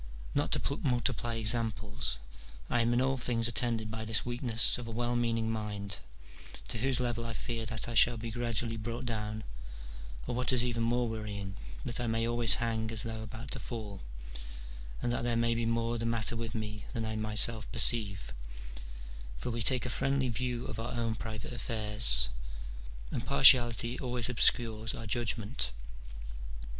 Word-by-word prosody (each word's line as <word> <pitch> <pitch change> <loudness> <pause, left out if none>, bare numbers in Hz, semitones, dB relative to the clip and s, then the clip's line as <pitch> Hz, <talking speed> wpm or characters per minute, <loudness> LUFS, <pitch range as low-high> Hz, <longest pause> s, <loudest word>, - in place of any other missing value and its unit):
Not - - 0
to 140 - 0
multiply 120 -2 0
examples, 110 - 0 0.5
I 120 - +3
am 115 +1 +1
in 120 +1 +2
all 135 +1 +1
things 115 -2 0
attended 115 -2 -1
by 110 0 -5
this 110 -1 +2
weakness 120 -1 +3
of 120 - -7
a - - -6
well 120 +2 -1
meaning 115 -2 0
mind, 105 -4 -4 0.7
to 115 - -1
whose 130 +1 +1
level 120 -2 -1
I 115 -1 -4
fear 115 0 -4
that 115 +2 -4
I 120 - -4
shall 120 +1 +5
be 115 +1 -6
gradually 115 -1 -2
brought 115 +3 -5
down, 110 -2 -3 0.8
or, - - -3
what 125 +2 +1
is 125 -2 +3
even 120 -2 -2
more 120 +1 +1
worrying, 105 -3 -5 0.3
that 120 - -1
I 120 - -2
may 115 0 0
always 120 -1 +2
hang 115 -2 -1
as 110 0 -2
though 110 -2 -5
about 110 +3 -8
to - - -2
fall, 105 -5 -7 1.0
and 120 - 0
that - - -1
there 120 -1 0
may 115 0 +2
be 115 0 -1
more 115 0 -1
the 115 - -3
matter 115 0 0
with 115 +1 -5
me 105 -1 -5
than 115 -3 -3
I 110 0 -3
myself 110 +1 +2
perceive: 100 - +4 1.0
for 120 - -4
we 115 0 -3
take 125 +3 +3
a - - -2
friendly 135 0 0
view 120 +1 -3
of 110 - -6
our 115 +2 -4
own 115 -1 -1
private 110 0 -6
affairs, 105 - +5 0.8
and - - -3
partiality 120 - +6
always 125 -2 -2
obscures 115 -2 +2
our 115 - -7
judgment. 110 - -2
115 Hz, 170 wpm, -31 LUFS, 110-120 Hz, 1.0 s, partiality